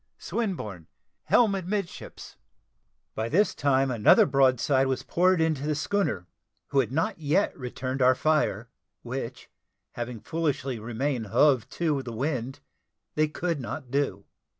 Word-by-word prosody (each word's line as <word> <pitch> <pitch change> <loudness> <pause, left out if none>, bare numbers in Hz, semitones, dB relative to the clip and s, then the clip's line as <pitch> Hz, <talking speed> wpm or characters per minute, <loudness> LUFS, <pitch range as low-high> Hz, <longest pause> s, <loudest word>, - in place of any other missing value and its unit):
Swinburne, 110 - -4 0.4
helm 225 -4 +4
a 195 - -1
midships." 195 0 -5 0.8
By 110 +1 -3
this 195 - +3
time 135 -1 +2
another 115 -4 +6
broadside 135 0 +3
was 130 -1 -1
poured 185 +1 +2
into 155 -3 0
the 155 - +1
schooner, 145 - -1 0.4
who 140 - +2
had 125 -4 +1
not 170 +7 -1
yet 155 +6 +1
returned 130 0 -4
our 130 0 +5
fire, 125 -7 0 0.3
which, 130 +1 -6 0.4
having 120 -1 -5
foolishly 140 -5 -2
remained 120 +1 -2
hove 125 +1 +3
to 155 -5 -1
the 125 -3 -7
wind, 130 0 -3 0.5
they 155 0 +2
could 165 +1 -2
not 125 +2 -6
do. 135 -9 -1
135 Hz, 135 wpm, -27 LUFS, 120-155 Hz, 0.8 s, another